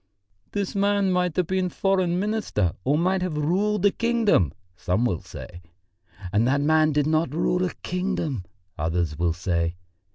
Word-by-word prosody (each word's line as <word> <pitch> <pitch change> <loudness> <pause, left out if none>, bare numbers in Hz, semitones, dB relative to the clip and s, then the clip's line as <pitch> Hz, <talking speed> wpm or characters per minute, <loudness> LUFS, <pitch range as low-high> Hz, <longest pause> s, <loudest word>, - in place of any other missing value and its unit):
'This 200 -2 -2
man 200 -1 +2
might 180 -3 +1
have 180 - +2
been 185 +1 0
Foreign 185 -1 +1
Minister 210 - 0
or 140 +6 +2
might 185 +3 +1
have 180 -4 -2
ruled 195 +6 +1
a 205 - +6
kingdom,' 230 - +2 0.2
some 90 +6 0
will 90 -9 -1
say. 85 - -10 0.7
'And 110 +4 +3
that 140 +2 +2
man 155 +1 +3
did 145 -1 +1
not 155 -2 +1
rule 180 +2 +1
a 180 - -2
kingdom,' 180 - -2 0.4
others 80 -1 -1
will 85 -1 +2
say. 85 -1 -1
165 Hz, 160 wpm, -25 LUFS, -, 0.7 s, a